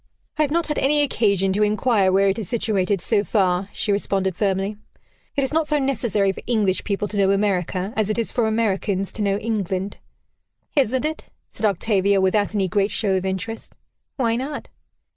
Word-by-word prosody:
"I - - +4
have 300 - +2
not 335 +2 +1
had 300 - -2
any 290 +2 +3
occasion 200 -8 +1
to 205 - 0
inquire 210 -2 +2
where 195 +1 +4
it 195 +3 +1
is 205 - -5
situated, 200 -5 0
so 205 0 +1
far," 190 -2 +1
she 210 - -2
responded 195 -2 0
firmly. 195 +1 -1 0.6
"It 280 - +2
is 265 - -1
not 320 -1 +1
so 300 - +2
necessary 240 -8 +1
for - - -9
English 210 -6 +1
people 205 0 -1
to 205 - -5
know 195 -1 +3
America 195 -1 0
as 215 -1 0
it 215 - 0
is 230 - -1
for 235 -3 +1
Americans 200 -3 0
to 220 - -4
know 200 -1 +1
England." 200 -3 -2 0.8
"Isn't 260 -1 +2
it?" 315 +1 -3 0.3
said 220 - 0
Octavia, 200 0 +2
without 205 +2 +1
any 195 -2 +1
great 195 +2 +1
show 200 -4 0
of 190 0 -1
interest. 205 +4 -5 0.4
"Why 230 -4 +1
not?" 275 +4 -5
205 Hz, 190 wpm, -22 LUFS, 195-230 Hz, 0.8 s, I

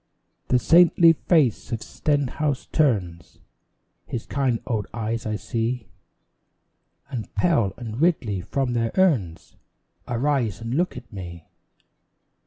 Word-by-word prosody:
The 125 - +3
saintly 165 +3 +6
face 150 - +1
of 115 -1 -3
Stenhouse 145 -1 -1
turns 95 - 0 0.7
His 115 - -4
kind 130 -4 0
old 110 -5 -2
eyes 115 0 -3
I 110 - -1
see; 115 +1 -3 1.2
And 120 -5 -5
Pell 120 - +2
and 115 +1 -6
Ridley 120 - +1
from 125 +6 -2
their 115 -1 0
urns 130 - +1 0.5
Arise 125 -3 0
and 115 +1 -5
look 175 +2 0
at 120 -2 -11
me. 85 -4 -9
120 Hz, 115 wpm, -24 LUFS, 110-145 Hz, 1.2 s, saintly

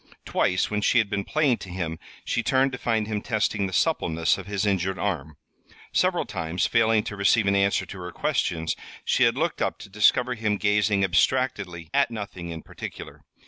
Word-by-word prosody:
Twice, 90 +3 +1
when 105 0 0
she 120 - +3
had 110 -4 +2
been 100 - -1
playing 145 0 +1
to 95 - -9
him, 85 -3 -4 0.3
she - - 0
turned 130 +2 +2
to 125 - -6
find 110 -2 0
him 105 -1 -3
testing 105 -2 0
the - - -7
suppleness 80 -2 +1
of 95 - -9
his 100 0 -1
injured 95 -2 0
arm. 80 -7 -3 0.6
Several - - +2
times, 80 +2 -2
failing 115 -2 +3
to 100 - -5
receive 100 +2 +3
an 100 0 +2
answer 100 0 +2
to 100 - -9
her 90 0 -6
questions, 80 -1 -1 0.3
she - - +3
had - - +2
looked - - -1
up - - 0
to - - -11
discover 120 +5 +3
him 110 -2 -1
gazing 105 -1 +2
abstractedly 95 -4 0
at - - +3
nothing 100 -6 -6
in 80 -1 -7
particular. - - -9
100 Hz, 190 wpm, -25 LUFS, 90-110 Hz, 0.6 s, she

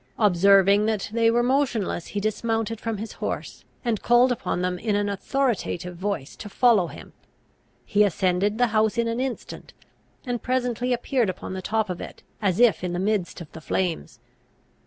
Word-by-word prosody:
Observing 200 +1 +5
that 215 -2 -2
they 230 0 +3
were 240 +1 +2
motionless, 245 -9 0
he 205 - -3
dismounted 225 +1 -2
from 225 -2 -3
his 220 +2 -6
horse, - - -5 0.2
and 230 -3 0
called 240 +1 +4
upon 180 -6 -2
them 180 0 -1
in 210 0 0
an 205 0 0
authoritative 200 -5 -2
voice 175 -6 -4
to 210 - -9
follow 220 -5 +3
him. - - -12 0.7
He 210 0 +3
ascended 195 +2 +1
the 245 - +4
house 220 +1 +2
in 235 0 +1
an 230 +1 -2
instant, 260 -1 -5 0.5
and 245 -2 -2
presently 250 -1 -1
appeared 245 -2 +1
upon 185 - -6
the 190 - -4
top 220 +2 0
of 180 -2 -5
it, - - -9 0.2
as 190 -2 +1
if 240 -6 +4
in 180 -1 -2
the - - -2
midst 195 -3 -1
of 160 - -10
the 160 - -10
flames. 165 -7 -2
215 Hz, 180 wpm, -24 LUFS, 190-235 Hz, 0.7 s, Observing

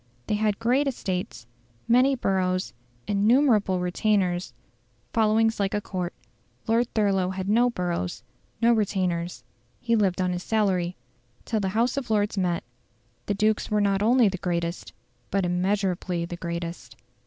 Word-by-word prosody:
They - - -2
had 210 -1 +1
great 255 +5 +2
estates, 185 - -3 0.4
many 255 +3 +4
boroughs, 185 -5 0 0.3
innumerable 210 -2 +3
retainers, 180 - 0 0.6
followings 225 0 +2
like 200 0 0
a - - +1
Court. 185 -3 -4 0.5
Lord 230 +2 +1
Thurlow 195 -4 +2
had 190 0 -4
no 235 +4 +4
boroughs, 175 - -3 0.4
no 235 +1 +6
retainers; 185 -5 -1 0.4
he 235 -1 +1
lived 195 -5 +1
on 185 -1 +1
his 180 - -3
salary. 185 -5 0 0.5
Till 220 - -1
the 195 -2 -1
House 240 +3 +1
of 255 -4 -3
Lords 210 -1 +1
met, 180 -3 0 0.6
the 205 - 0
dukes 215 +1 +1
were 210 - +2
not 200 -1 +2
only 235 +2 +5
the 190 -2 -2
greatest, 170 -1 -3 0.4
but 195 -1 0
immeasurably 180 -1 0
the 175 - -6
greatest. 170 0 -6
200 Hz, 145 wpm, -25 LUFS, 180-220 Hz, 0.6 s, no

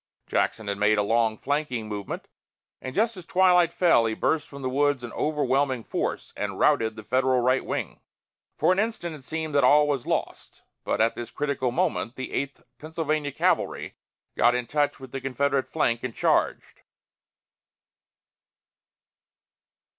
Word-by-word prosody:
Jackson 110 -2 -1
had 100 0 -2
made 105 +1 +3
a 105 - +2
long 115 +1 +1
flanking 135 -5 -2
movement, 105 -2 -5 0.5
and 130 - -6
just 225 +2 +2
as 185 - -9
twilight 180 -1 +4
fell, 165 -12 +4
he 110 - -2
burst 150 +4 0
from 140 -1 -10
the - - -1
woods 145 -1 +1
in 120 - -7
overwhelming 135 -4 0
force - - -3
and - - -3
routed 110 -1 +2
the 110 - -9
Federal 130 +2 +2
right 130 +2 +2
wing. - - -4 0.6
For - - +3
an 185 - +2
instant 210 -7 -2
it 145 - -13
seemed 160 +1 -4
that 140 - +3
all 150 0 +6
was 140 -4 -1
lost, - - -3 0.2
but - - 0
at 115 +1 +3
this 120 - -6
critical 140 -3 -1
moment 160 -6 -1
the 130 - -6
Eighth 140 0 -3 0.2
Pennsylvania 155 -2 -2
cavalry - - 0 0.4
got 120 +1 +4
in 125 -1 -1
touch 145 +1 0
with 130 -2 -11
the 135 - -5
Confederate 135 +1 0
flank 120 -7 0
and 125 -3 -4
charged. - - 0
135 Hz, 160 wpm, -26 LUFS, 120-150 Hz, 0.6 s, all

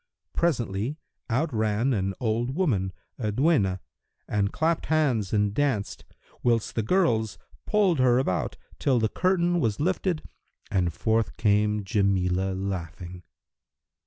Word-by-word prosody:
Presently, 120 - 0 0.3
out 130 +6 0
ran 110 +4 +1
an 95 -3 -1
old 120 +2 -1
woman, 110 - +1 0.3
a 110 -3 -1
duenna, 105 - +2 0.5
and 100 0 0
clapped 165 +1 0
hands 135 -11 +1
and 105 -1 +1
danced, 130 -6 -1 0.4
whilst 115 -2 +1
the 115 - 0
girls 110 - +1 0.3
pulled 195 -7 +3
her 125 -1 +4
about, 95 -9 -1 0.2
till 135 -3 +2
the 110 -2 +1
curtain 175 +1 +1
was 115 -8 0
lifted 180 +1 0 0.5
and 90 -3 +1
forth 110 +5 0
came 105 -1 +2
Jamilah 95 -1 +1
laughing. 90 -2 -5
110 Hz, 125 wpm, -26 LUFS, 100-145 Hz, 0.5 s, her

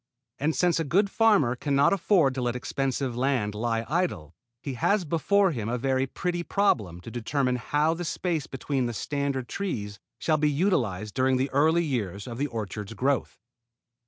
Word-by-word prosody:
And 155 +3 0
since 175 -2 +2
a - - +1
good 195 +6 +2
farmer 205 - +3
can 140 +2 -1
not 140 +6 +4
afford 175 -7 +3
to 130 - -3
let 120 0 -1
expensive 130 0 -2
land 125 -5 0
lie 115 +1 -1
idle 130 - -1 0.3
he 140 - -3
has 185 - +1
before 190 +5 +2
him 115 -7 -3
a 125 - 0
very 130 +1 0
pretty 175 +5 -2
problem 105 - 0
to 115 - -9
determine 125 +2 0
how 150 +6 +1
the 175 +1 -5
space 165 -2 -2
between 135 -1 -2
the 120 - -3
standard 140 +1 -2
trees 105 - -4 0.2
shall 155 -1 +1
be 150 0 +2
utilized 120 - 0
during 130 +2 +2
the 130 +1 -1
early 160 +5 +3
years 105 - -3
of 120 -1 -7
the 145 - +1
orchard's 110 -2 -5
growth. 135 +3 0
135 Hz, 180 wpm, -27 LUFS, 120-160 Hz, 0.3 s, not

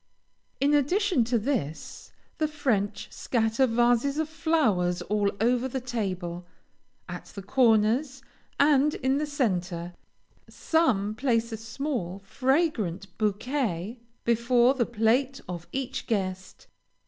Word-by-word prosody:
In 285 +2 +3
addition 345 - +2
to 240 +1 +1
this, 215 - -3 0.3
the 310 - +2
French 250 -10 -1
scatter 230 +2 +1
vases 240 +4 +2
of 315 -1 -1
flowers 230 - +1
all 205 -1 +1
over 245 +3 +2
the 265 +1 -3
table, 185 -8 -4 0.6
at - - -7
the 200 - -10
corners 250 +4 +2 0.4
and 290 0 +4
in 265 +2 0
the 300 - -1
centre. 180 -11 -2 0.6
Some 230 -12 +1
place 230 -1 0
a 225 - -4
small, 225 - -4
fragrant 215 - 0
bouquet 215 - -1 0.3
before 235 +2 +3
the 245 -4 0
plate 245 +4 +1
of 175 -1 -6
each 270 0 -4
guest. 190 -4 -3
235 Hz, 115 wpm, -27 LUFS, 200-275 Hz, 0.6 s, and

